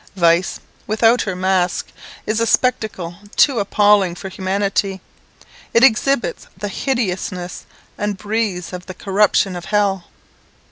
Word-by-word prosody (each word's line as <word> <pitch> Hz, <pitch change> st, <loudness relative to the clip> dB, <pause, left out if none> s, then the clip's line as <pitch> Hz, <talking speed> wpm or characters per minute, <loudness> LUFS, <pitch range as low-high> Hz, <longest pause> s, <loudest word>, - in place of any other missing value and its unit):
Vice, 170 Hz, 0 st, +2 dB, 0.3 s
without 225 Hz, +3 st, +3 dB
her 190 Hz, -3 st, -3 dB
mask, 185 Hz, -1 st, 0 dB, 0.4 s
is 215 Hz, +1 st, 0 dB
a 230 Hz, -, +1 dB
spectacle 215 Hz, -8 st, 0 dB, 0.2 s
too 270 Hz, -6 st, +4 dB
appalling 205 Hz, -3 st, +3 dB
for 190 Hz, -, -7 dB
humanity; 195 Hz, +1 st, -1 dB, 0.8 s
it 230 Hz, -, +6 dB
exhibits 275 Hz, -, +2 dB
the 205 Hz, -, -4 dB
hideousness, 190 Hz, -7 st, -3 dB, 0.3 s
and 205 Hz, -1 st, -2 dB
breathes 205 Hz, -4 st, -2 dB
of 180 Hz, 0 st, -7 dB
the 185 Hz, -, -7 dB
corruption 195 Hz, 0 st, +2 dB
of 175 Hz, -, -7 dB
hell. 200 Hz, -3 st, 0 dB
200 Hz, 125 wpm, -19 LUFS, 185-215 Hz, 0.8 s, it